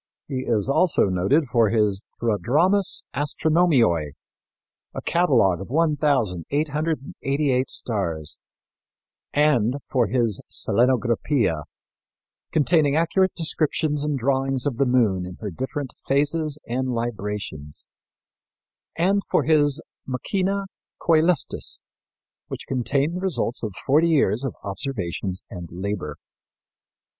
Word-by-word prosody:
He 130 Hz, -2 st, -3 dB
is 110 Hz, -2 st, +1 dB
also 140 Hz, -, +3 dB
noted 95 Hz, -, +2 dB
for 115 Hz, -4 st, +2 dB
his 105 Hz, -3 st, +1 dB, 0.2 s
Prodromus 145 Hz, -, +2 dB
Astronomiæ, 145 Hz, -, +2 dB, 0.8 s
a -, -, -3 dB
catalogue 100 Hz, -, +3 dB
of 95 Hz, -, -8 dB
1,888 145 Hz, -, 0 dB
stars; 85 Hz, -, -2 dB, 1.5 s
for 125 Hz, -4 st, +1 dB
his 115 Hz, -4 st, 0 dB
Selenographia, 120 Hz, -, +1 dB, 0.9 s
containing 155 Hz, -2 st, +3 dB
accurate 170 Hz, +3 st, +2 dB
descriptions 155 Hz, -2 st, 0 dB
and 150 Hz, -2 st, 0 dB
drawings 135 Hz, +1 st, 0 dB
of 135 Hz, -5 st, -1 dB
the 140 Hz, -, +2 dB
moon 110 Hz, -8 st, +2 dB
in 90 Hz, 0 st, -7 dB
her 105 Hz, 0 st, -6 dB
different 130 Hz, -, -4 dB
phases 150 Hz, +2 st, +1 dB
and 130 Hz, +2 st, -2 dB
librations, 105 Hz, -, -4 dB, 1.1 s
and 195 Hz, +4 st, +2 dB
for -, -, +2 dB
his 150 Hz, -1 st, +3 dB, 0.2 s
Machina 195 Hz, -, -1 dB, 0.3 s
Coelestis, 165 Hz, -2 st, +1 dB, 0.7 s
which -, -, -6 dB
contained 140 Hz, +6 st, 0 dB
the -, -, -5 dB
results 140 Hz, -10 st, -1 dB
of 105 Hz, -5 st, -4 dB
forty 155 Hz, +5 st, +4 dB
years 140 Hz, -8 st, +2 dB
of 130 Hz, -, -3 dB
observations 95 Hz, -3 st, -3 dB
and 85 Hz, -3 st, -7 dB
labor. 90 Hz, -4 st, -4 dB
130 Hz, 100 wpm, -23 LUFS, 105-155 Hz, 1.5 s, forty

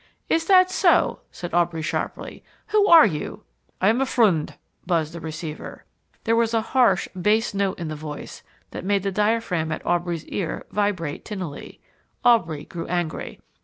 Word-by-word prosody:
"Is 325 Hz, 0 st, +2 dB
that 370 Hz, 0 st, +5 dB
so?" -, -, +3 dB
said 175 Hz, -, -7 dB
Aubrey 170 Hz, -2 st, +1 dB
sharply. 155 Hz, -, -4 dB, 0.3 s
"Who 420 Hz, -1 st, +3 dB
are 330 Hz, -5 st, +9 dB
you?" 155 Hz, -8 st, -4 dB, 0.4 s
"I 190 Hz, -, +2 dB
am 235 Hz, +4 st, +2 dB
a -, -, +3 dB
friend," 195 Hz, -13 st, +2 dB, 0.3 s
buzzed 165 Hz, -3 st, 0 dB
the 170 Hz, -, -6 dB
receiver. 155 Hz, -1 st, -7 dB, 0.4 s
There 225 Hz, 0 st, +2 dB
was 230 Hz, 0 st, +1 dB
a 225 Hz, -, +3 dB
harsh, 245 Hz, -8 st, +4 dB
bass 210 Hz, +5 st, +1 dB
note 195 Hz, -1 st, -1 dB
in 170 Hz, -, -5 dB
the 155 Hz, -, -4 dB
voice 150 Hz, -1 st, -8 dB, 0.3 s
that -, -, -6 dB
made 200 Hz, 0 st, +1 dB
the 195 Hz, -, -1 dB
diaphragm 210 Hz, -6 st, 0 dB
at 155 Hz, -, -5 dB
Aubrey's 175 Hz, -2 st, -1 dB
ear 175 Hz, -5 st, -4 dB
vibrate 190 Hz, -8 st, -1 dB
tinnily. 185 Hz, -9 st, -7 dB, 0.4 s
Aubrey 170 Hz, -11 st, +3 dB
grew 170 Hz, -2 st, -7 dB
angry. 175 Hz, -2 st, -3 dB
185 Hz, 165 wpm, -23 LUFS, 160-225 Hz, 0.4 s, are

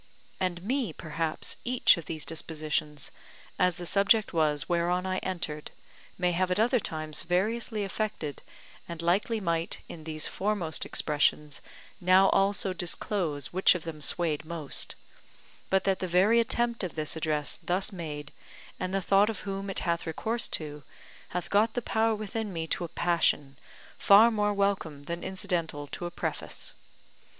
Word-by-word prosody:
And 180 Hz, -2 st, -1 dB
me 245 Hz, -1 st, 0 dB
perhaps 160 Hz, 0 st, -3 dB
each 250 Hz, 0 st, +5 dB
of 170 Hz, -, -7 dB
these 155 Hz, -3 st, -3 dB
dispositions, 155 Hz, -2 st, -2 dB, 0.5 s
as 180 Hz, -1 st, +4 dB
the 175 Hz, -, -7 dB
subject 200 Hz, +3 st, +4 dB
was 155 Hz, -2 st, +1 dB
whereon 175 Hz, +1 st, +1 dB
I 185 Hz, 0 st, 0 dB
entered, 170 Hz, -5 st, -4 dB, 0.5 s
may 180 Hz, -1 st, +2 dB
have 180 Hz, +1 st, +1 dB
at 180 Hz, +2 st, 0 dB
other 245 Hz, +3 st, +4 dB
times 155 Hz, -5 st, -2 dB
variously 210 Hz, +5 st, 0 dB
affected; 195 Hz, -7 st, -3 dB, 0.5 s
and 170 Hz, -1 st, -6 dB
likely 200 Hz, +6 st, +2 dB
might 170 Hz, -3 st, -1 dB
in 160 Hz, -, -9 dB
these 155 Hz, -1 st, -2 dB
foremost 190 Hz, -6 st, -1 dB
expressions 150 Hz, -1 st, +1 dB, 0.4 s
now 185 Hz, +1 st, +6 dB
also 195 Hz, -1 st, +2 dB
disclose 170 Hz, -4 st, -2 dB
which 185 Hz, 0 st, +5 dB
of 175 Hz, -, -4 dB
them 160 Hz, -2 st, -7 dB
swayed 160 Hz, -1 st, 0 dB
most, 160 Hz, -3 st, -2 dB, 0.7 s
but 190 Hz, 0 st, +3 dB
that 195 Hz, -1 st, +1 dB
the 185 Hz, -, -2 dB
very 190 Hz, +7 st, +4 dB
attempt 235 Hz, -1 st, 0 dB
of 180 Hz, -, -4 dB
this 155 Hz, -1 st, 0 dB
address 155 Hz, -2 st, 0 dB
thus 185 Hz, +2 st, -1 dB
made, 150 Hz, -5 st, -6 dB, 0.5 s
and 185 Hz, +1 st, -2 dB
the 195 Hz, -, 0 dB
thought 200 Hz, +3 st, +4 dB
of 215 Hz, -4 st, -4 dB
whom 195 Hz, 0 st, -4 dB
it 195 Hz, -, -3 dB
hath 170 Hz, -1 st, -1 dB
recourse 225 Hz, +8 st, -1 dB
to, 150 Hz, -2 st, -1 dB, 0.5 s
hath 180 Hz, -1 st, -3 dB
got 215 Hz, +2 st, +3 dB
the -, -, +2 dB
power 220 Hz, 0 st, +2 dB
within 215 Hz, 0 st, -4 dB
me 165 Hz, -2 st, -3 dB
to 175 Hz, -, -2 dB
a -, -, -2 dB
passion, 165 Hz, -5 st, +1 dB, 0.4 s
far 215 Hz, +4 st, +7 dB
more 210 Hz, -1 st, +1 dB
welcome 195 Hz, -8 st, 0 dB
than 170 Hz, +3 st, -5 dB
incidental 175 Hz, -6 st, -2 dB
to 175 Hz, +4 st, -5 dB
a -, -, -4 dB
preface. 175 Hz, -, -4 dB
180 Hz, 160 wpm, -29 LUFS, 160-200 Hz, 0.7 s, far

